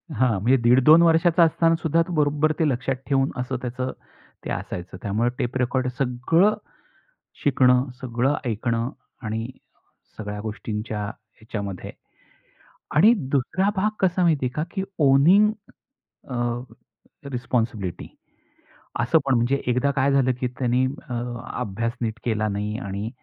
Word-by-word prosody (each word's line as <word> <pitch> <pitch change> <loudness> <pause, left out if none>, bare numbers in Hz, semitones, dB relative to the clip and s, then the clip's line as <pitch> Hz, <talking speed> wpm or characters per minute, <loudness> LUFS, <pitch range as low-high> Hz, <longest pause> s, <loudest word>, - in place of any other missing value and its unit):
हां 125 0 +2
म्हणजे 125 +5 +4
दीड-दोन 130 +7 +6
वर्षाचा 170 +1 +4
असताना 165 +1 +3
सुद्धा 165 +1 +2
तो 180 - -5
बरोबर 150 0 +2
ते 160 - +3
लक्षात 130 +1 -1
ठेवून 135 -1 +2
असं 125 0 -3
त्याचं 125 +1 -3 0.5
ते - - -4
असायचं. 90 +1 -5
त्यामुळे 110 +4 +1
टेप 125 +2 -1
रेकॉर्डर 130 +1 0
सगळं 140 +11 +2 0.9
शिकणं, 130 -1 +3
सगळं 130 +3 0
ऐकणं 115 +1 -1 0.3
आणि 110 +2 -3 0.7
सगळ्या 105 -1 -5
गोष्टींच्या 110 0 -4
ह्याच्यामध्ये. 105 -2 -7 1.0
आणि 210 +10 +7 0.2
दुसरा 185 +9 +1
भाग 205 +2 +2
कसा 185 -1 +2
माहितीये 145 -7 +2
का? 150 - 0
की 190 -2 -2 0.2
ओनिंग 155 +10 +5 0.8
अ, - - -4 1.0
रिस्पॉन्सिबिलिटी, 115 -7 -2 0.9
असं 120 +8 +3
पण 135 -2 +2
म्हणजे. 120 +4 +1
एकदा 125 +3 +2
काय 135 +1 +3
झालं, 135 -2 +3
की 125 - +1
त्यांनी 125 +1 +2 0.2
अ, - - -4 0.5
अभ्यास 115 +1 -2
नीट 115 0 -2
केला 110 -2 0
नाही 105 +2 -3
आणि 100 -1 -4
125 Hz, 130 wpm, -24 LUFS, 115-145 Hz, 1.0 s, आणि